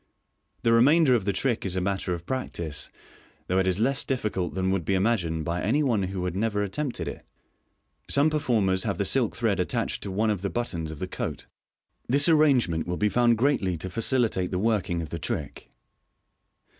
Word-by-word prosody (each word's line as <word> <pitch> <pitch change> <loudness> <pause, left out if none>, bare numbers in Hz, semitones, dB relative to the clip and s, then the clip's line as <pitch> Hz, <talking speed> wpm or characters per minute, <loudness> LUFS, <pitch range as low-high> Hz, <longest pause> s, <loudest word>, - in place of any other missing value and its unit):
The 115 - +4
remainder 140 +4 +5
of 115 -6 +1
the 100 - +2
trick 115 +5 -1
is 95 -2 -2
a - - +1
matter 95 0 -2
of 85 0 -10
practice, 85 - -4 0.6
though 90 +1 +1
it 95 - +1
is 95 +1 +1
less 135 +4 +2
difficult 105 -10 -2
than 95 0 0
would 95 -3 0
be 95 - 0
imagined 95 -6 0
by 85 +1 -2
any 140 +10 +1
one 120 -7 +1
who 95 -1 -3
had 90 -1 -3
never 105 0 0
attempted 130 +7 -3
it. - - -6 0.9
Some 145 +3 +3
performers 110 -11 +1
have - - -2
the - - 0
silk - - +1
thread - - 0
attached - - -1
to - - -5
one 105 +3 +1
of 100 -4 -2
the 100 - -2
but 120 +3 -1
tons 80 -2 -4
of 80 - -7
the 90 - -4
coat. - - -5 0.6
This 140 +3 +4
arrangement 135 - +3
will 90 0 -2
be 105 - +2
found 120 0 +3
greatly 105 -9 +1
to 95 +4 -6
facilitate 115 -5 +1
the 90 - -2
working 95 -5 0
of 80 - -7
the 85 - -5
trick. - - -5
100 Hz, 200 wpm, -26 LUFS, 90-120 Hz, 0.9 s, remainder